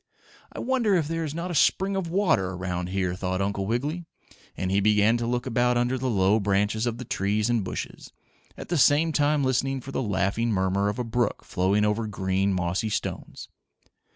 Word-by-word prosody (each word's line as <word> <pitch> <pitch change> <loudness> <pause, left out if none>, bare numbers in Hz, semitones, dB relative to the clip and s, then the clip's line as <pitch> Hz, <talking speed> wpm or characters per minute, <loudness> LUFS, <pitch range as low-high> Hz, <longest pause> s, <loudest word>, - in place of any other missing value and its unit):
"I - - -12
wonder 240 -6 +1
if 165 -5 +1
there 165 +1 -2
is 155 -1 -4
not 175 +2 -4
a - - -3
spring 190 +5 +2
of 190 -3 -2
water 160 - +1
around 90 -1 -3
here?" 90 -1 -1
thought 95 0 -3
Uncle 100 0 -1
Wiggily, 145 - -2 0.5
and 95 0 -2
he 100 - +3
began 105 +2 +3
to 120 0 -3
look 120 0 -1
about 125 -1 +1
under 120 +2 +1
the 130 0 -2
low 100 0 +3
branches 105 +3 0
of 115 -1 -2
the 125 - -7
trees 105 +3 0
and 115 -4 +1
bushes, 90 - -6 0.5
at - - -9
the 170 -2 +1
same 150 +4 +4
time 150 -1 +2
listening 130 +1 0
for 135 +2 -9
the 130 - -2
laughing 100 +1 0
murmur 95 +1 +1
of 105 - -4
a 125 - -1
brook 120 -1 -1
flowing 100 +3 +1
over 105 +1 0
green, 95 -1 0
mossy 90 +3 -1
stones. 105 - -5
110 Hz, 200 wpm, -26 LUFS, 95-135 Hz, 0.5 s, same